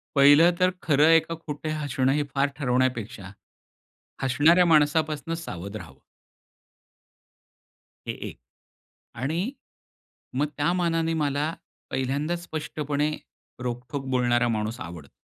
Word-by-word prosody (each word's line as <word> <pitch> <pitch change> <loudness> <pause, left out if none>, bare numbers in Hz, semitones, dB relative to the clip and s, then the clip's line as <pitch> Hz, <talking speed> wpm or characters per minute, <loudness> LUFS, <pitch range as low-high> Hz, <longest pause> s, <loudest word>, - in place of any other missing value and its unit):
पहिलं 145 +5 +7
तर 185 0 +4
खरं 150 -1 +4
आहे 165 0 +7
का 165 +1 -6
खोटं 155 -1 -6
हसणं 135 -2 +1
हे 150 +1 +1
फार 140 +1 +3
ठरवण्यापेक्षा, 125 - -1 0.9
हसणाऱ्या 150 +7 +5
माणसापासून 155 -1 +2
सावध 100 - -7
राहावं. 80 -10 -10 2.1
हे - - 0 0.2
एक - - -13 0.9
आणि 160 +6 0 1.0
मग 150 - +2
त्या 145 +3 +2
मानाने 165 -2 +1
मला 150 0 0 0.4
पहिल्यांदाच 145 +6 -1
स्पष्टपणे 150 -2 -2 0.5
रोखठोक 125 +2 -4
बोलणारा 120 -1 +2
माणूस 110 +1 -2
आवडतो. 80 -4 -8
145 Hz, 105 wpm, -26 LUFS, 125-160 Hz, 2.1 s, पहिलं